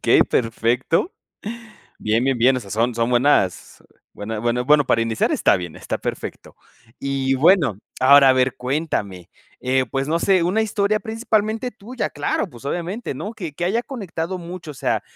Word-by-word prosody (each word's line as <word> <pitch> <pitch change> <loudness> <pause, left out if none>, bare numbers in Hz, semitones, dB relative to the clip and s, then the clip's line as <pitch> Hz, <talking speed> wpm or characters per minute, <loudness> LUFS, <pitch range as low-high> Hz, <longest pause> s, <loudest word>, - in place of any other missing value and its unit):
okey, - - +5
perfecto. 120 - 0 0.9
Bien, 110 +3 +1
bien, 135 -3 +1
bien, 130 +2 +4
o - - -2
sea, 100 - -12
son 115 +3 0
son 115 +1 0
buenas 120 -7 +1 0.3
buena 110 +1 -5
bueno 120 +2 0
bueno 145 0 +4
para 115 - +2
iniciar, 115 -1 0
está - - +3
bien, 85 -3 -6
está - - -4
perfecto. - - -6 0.5
Y 135 -1 0
bueno, 145 - +4 0.2
ahora, 140 +1 +7
a 130 - +7
ver, 130 0 +1
cuéntame, 125 - -3 0.3
eh, 130 +1 +1
pues, 135 0 -1
no 165 +2 +1
sé, 185 -3 +3
una 205 +6 +1
historia 215 -1 0
principalmente 220 +1 -1
tuya, 220 -5 -5
claro, 145 - -2
pues, 120 +1 -14
obviamente, 175 +10 -3
¿no?, 210 - -5
que 170 -9 -6
que 175 - -3
haya 225 +7 +1
conectado 190 - -5
mucho, 175 -2 -8
o - - -16
sea, 130 - -1
140 Hz, 175 wpm, -21 LUFS, 120-185 Hz, 0.9 s, ahora